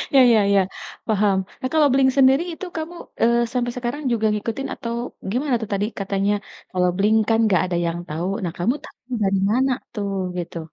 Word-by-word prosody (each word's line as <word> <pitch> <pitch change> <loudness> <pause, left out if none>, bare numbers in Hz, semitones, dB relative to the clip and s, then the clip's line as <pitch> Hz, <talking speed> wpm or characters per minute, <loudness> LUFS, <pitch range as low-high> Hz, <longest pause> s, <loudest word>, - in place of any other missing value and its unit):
Ya 270 - +9
ya 220 - +5
ya, 195 - +5 0.5
paham. 205 -3 +2 0.3
Eh 255 - 0
kalau 305 -2 +5
Blink-182 265 0 +3
sendiri 270 +3 +5
itu 375 - -7
kamu, 325 +2 -5 0.3
eee, 235 +1 +4
sampai 245 -1 0
sekarang 250 +5 -3
juga 225 -2 +1
ngikutin 225 +6 -3
atau 235 0 -5 0.4
gimana 260 +2 +1
tuh? 220 - -5
Tadi 200 +1 +1
katanya 195 +1 0 0.4
kalau 180 -1 +2
Blink-182 215 +2 +3
kan 225 - +3
gak 170 - +4
ada 180 -1 -1
yang 170 +1 -2
tahu, 165 +4 -2 0.2
nah 175 -2 -2
kamu 205 +9 +1
tahu - - -13 0.2
dari 195 0 +2
mana 260 +3 +2 0.2
tuh, 200 -2 -3 0.2
gitu? 175 -1 -5
220 Hz, 190 wpm, -22 LUFS, 195-260 Hz, 0.5 s, Ya